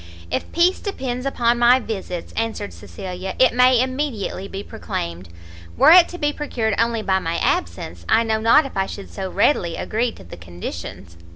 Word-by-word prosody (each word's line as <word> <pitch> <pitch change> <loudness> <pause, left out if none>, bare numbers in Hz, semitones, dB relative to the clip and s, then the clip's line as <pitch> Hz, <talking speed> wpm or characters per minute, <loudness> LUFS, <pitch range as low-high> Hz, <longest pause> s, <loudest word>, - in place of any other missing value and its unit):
"If - - -3
peace 350 +2 +3
depends 260 - -4
upon 240 -3 +1
my 240 +1 +6
visits," 190 -7 -6
answered 225 -2 -3
Cecilia, 185 -1 -7
"it 260 - +4
may 250 0 +5
immediately 255 -7 -2
be 195 0 -6
proclaimed; 85 - -6 0.5
were - - +7
it 350 0 +8
to 355 - -7
be 295 -3 0
procured 235 -8 -2
only 230 -1 +1
by 190 -1 +2
my 165 -1 -2
absence, 85 - -2
I 230 - +4
know 220 -1 0
not 230 +7 +5
if 275 - -8
I 195 0 0
should 200 - -8
so 190 -2 -5
readily 180 - +1
agree 230 +2 -1
to - - -14
the 85 - -11
conditions." 85 0 -8
225 Hz, 180 wpm, -21 LUFS, 190-255 Hz, 0.5 s, it